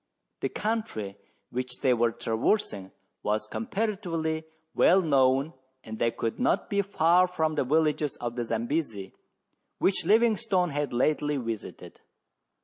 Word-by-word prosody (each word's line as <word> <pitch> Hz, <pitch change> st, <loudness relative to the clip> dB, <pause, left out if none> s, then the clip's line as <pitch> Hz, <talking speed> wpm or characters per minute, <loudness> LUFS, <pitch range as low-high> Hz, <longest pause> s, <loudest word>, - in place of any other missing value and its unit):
The -, -, -1 dB
country 210 Hz, -, -3 dB, 0.4 s
which 125 Hz, 0 st, -4 dB
they 130 Hz, -, +4 dB
were 120 Hz, -1 st, +2 dB
traversing 110 Hz, -, -1 dB, 0.3 s
was 105 Hz, +1 st, -1 dB
comparatively 175 Hz, -8 st, -2 dB, 0.3 s
well 185 Hz, -, +5 dB
known 140 Hz, -2 st, +2 dB, 0.3 s
and 110 Hz, 0 st, -8 dB
they 115 Hz, -, +3 dB
could 115 Hz, -1 st, -3 dB
not 245 Hz, -, +1 dB
be 200 Hz, 0 st, +3 dB
far 180 Hz, -2 st, +3 dB
from 160 Hz, -3 st, -1 dB
the 150 Hz, -, +1 dB
villages 150 Hz, +1 st, +1 dB
of 120 Hz, -1 st, -4 dB
the 120 Hz, -, -1 dB
Zambesi 115 Hz, -2 st, -2 dB, 0.6 s
which 190 Hz, -2 st, +1 dB
Livingstone 215 Hz, -3 st, +3 dB
had 145 Hz, -1 st, -2 dB
lately 145 Hz, +4 st, +1 dB
visited. 115 Hz, -4 st, -6 dB
150 Hz, 130 wpm, -28 LUFS, 120-180 Hz, 0.6 s, well